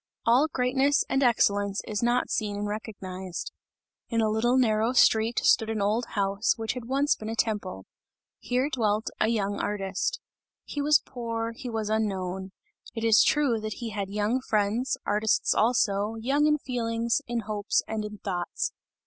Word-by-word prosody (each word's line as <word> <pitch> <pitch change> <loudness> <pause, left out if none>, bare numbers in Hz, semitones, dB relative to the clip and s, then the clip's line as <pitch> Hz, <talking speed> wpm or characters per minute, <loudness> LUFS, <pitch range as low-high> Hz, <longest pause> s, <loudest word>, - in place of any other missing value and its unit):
All 250 +6 +4
greatness 265 +1 +2
and 270 - +1
excellence 205 -5 +2
is 210 -1 -2
not 240 +1 +1
seen 210 -2 -1
and 205 0 -2
recognized. 190 -4 -6 0.6
In 230 - 0
a 220 -1 +2
little 240 +4 +2
narrow 225 -1 +2
street, 225 -2 +4
stood 220 - +4
an 220 -1 -2
old 215 +4 +1
house, 200 +3 +1
which 225 -1 -2
had 250 -2 -7
once 275 +4 +2
been 215 - -7
a 225 - -3
temple; 205 - -2 0.5
here 255 +3 0
dwelt 215 -4 0
a - - +3
young 205 -3 -1
artist; 205 - -2 0.5
he 290 - -4
was 295 +1 +4
poor, 230 -2 -4
he 245 +2 -7
was 220 -2 -2
unknown; 190 -3 -2 0.4
it 225 - -4
is 225 -2 +6
true 275 -7 +2
that 215 0 -4
he 230 +1 -6
had 200 -2 -3
young 210 +5 0
friends, 220 +2 0
artists 210 +1 +2
also, 215 -2 +1
young 275 +7 +1
in 300 0 +3
feelings, 230 -3 -1
in 235 -1 -2
hopes, 210 -1 -1
and 220 -1 -3
in 210 0 -7
thoughts. 180 -4 -3
220 Hz, 165 wpm, -27 LUFS, 205-245 Hz, 0.6 s, is